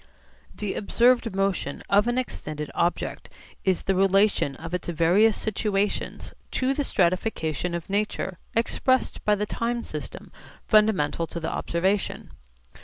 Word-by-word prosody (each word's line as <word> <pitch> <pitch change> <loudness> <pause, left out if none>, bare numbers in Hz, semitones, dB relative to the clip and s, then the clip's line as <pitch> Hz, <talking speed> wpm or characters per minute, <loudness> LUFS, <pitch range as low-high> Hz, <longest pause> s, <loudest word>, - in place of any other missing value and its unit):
The 210 -2 -3
observed 240 0 +2
motion 195 -7 -1
of 205 +3 +4
an 240 +1 +1
extended 155 - -4
object 175 +1 -1 0.3
is 190 -2 +1
the 195 - +1
relation 195 -6 +3
of 165 +4 -8
its 180 - -3
various 175 +6 +3
situations 205 -1 -1 0.2
to 260 +1 +1
the 290 - -1
stratification 180 - 0
of 170 - -5
nature 195 -2 -2 0.2
expressed 255 +2 +1
by 210 - +4
the 210 +1 -1
time 235 +2 -2
system - - -8 0.4
fundamental 210 -7 +3
to 170 - -6
the 160 - -3
observation. 190 +4 -1
195 Hz, 130 wpm, -25 LUFS, 170-220 Hz, 0.4 s, of